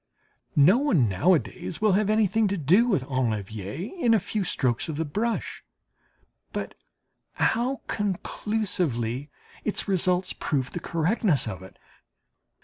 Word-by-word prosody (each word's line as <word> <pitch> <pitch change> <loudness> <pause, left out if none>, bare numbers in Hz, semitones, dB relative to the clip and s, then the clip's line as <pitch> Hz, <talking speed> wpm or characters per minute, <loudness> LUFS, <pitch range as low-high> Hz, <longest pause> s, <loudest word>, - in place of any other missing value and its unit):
No 170 - +6
one 185 - +3
nowadays 110 - 0
will 215 -1 +3
have 205 +2 +2
anything 215 0 +3
to 200 0 -1
do 185 - +4
with 190 - +1
enlever 110 - -3
in 235 -7 +4
a - - +4
few 200 +2 -2
strokes 130 -6 0
of 155 - -3
the 160 - -1
brush. 220 +10 -2 0.9
But - - -4 0.6
how 250 +4 0
conclusively 180 - -2 0.3
its 215 - -1
results 185 -1 +1
prove 135 -4 -2
the - - -4
correctness 170 - +1
of 95 -3 -5
it! 95 - -13
180 Hz, 130 wpm, -26 LUFS, 130-210 Hz, 0.9 s, No